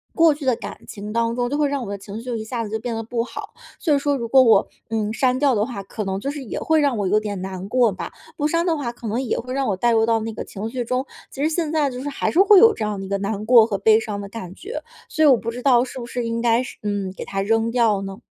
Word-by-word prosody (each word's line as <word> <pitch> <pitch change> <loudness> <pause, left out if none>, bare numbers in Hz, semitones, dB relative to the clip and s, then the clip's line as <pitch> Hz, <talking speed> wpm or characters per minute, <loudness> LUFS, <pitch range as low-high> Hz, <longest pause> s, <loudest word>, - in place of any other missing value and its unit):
过 330 -2 +5
去 285 -1 -8
的 255 -3 +3
感 - - -8
情 210 0 -7
当 230 0 0
中， 245 0 -1
就 290 - -1
会 295 -1 +2
让 280 -3 -2
我 200 - -7
的 200 - -4
情 200 +1 -10
绪 230 - -7
就 250 -2 -3
一 220 - -4
下 230 +1 -3
子 215 - -6
就 220 +1 -2
变 230 0 -4
得 225 - -3
不 230 +1 -2
好。 - - -8 0.3
所 310 -5 +1
以 280 - +3
说 285 0 +1
如 235 -2 -4
果 260 +2 +6
我， 225 - +5 0.2
嗯， 215 -1 -1
删 255 +2 +2
掉 280 -3 +3
的 210 +1 +1
话， 205 -6 -6
可 210 +2 -5
能 190 0 -2
就 275 +7 -3
是 290 -2 -6
也 230 - -5
会 320 -1 +2
让 280 -5 +1
我 200 -2 0
有 210 +3 +3
点 205 -3 -5
难 190 0 -6
过 245 -2 +3
吧， 190 - -6 0.3
不 295 - +1
删 335 +3 +1
的 335 - +2
话 245 -5 -3
可 235 -1 -9
能 230 +5 -1
也 255 - -1
会 255 +2 -6
让 270 -1 0
我 200 - +1
带 240 +4 +2
入 225 -1 +3
到 225 0 +2
那 225 0 -4
个 - - -5
情 210 +2 -6
绪 245 +1 -3
中， 255 +3 -1 0.2
其 280 - -5
实 310 - +3
现 320 -1 -1
在 300 -3 +2
就 250 - -6
是 290 - -3
还 275 - -1
是 350 - +1
会 400 0 +7
有 455 0 +7
这 220 - -4
样 210 -2 -3
的 195 - -5
一 - - -9
个 200 - 0
难 205 +1 -3
过 235 -2 +7
和 205 -3 -2
悲 220 +2 +5
伤 215 -2 -4
的 200 - -7
感 185 -5 -8
觉。 445 +5 -6 0.3
所 315 - +1
以 - - +7
我 260 -4 +6
不 230 +1 -4
知 245 +1 -7
道 245 -3 +4
是 260 0 -7
不 235 - -6
是 240 0 -4
应 230 0 -2
该 235 +1 +3
是 - - -9
嗯， 200 -2 -2
给 - - -6
它 195 - -2
扔 225 +3 +1
掉 225 -5 +2
呢？ 195 0 -6
230 Hz, 345 characters per minute, -22 LUFS, 210-265 Hz, 0.3 s, 会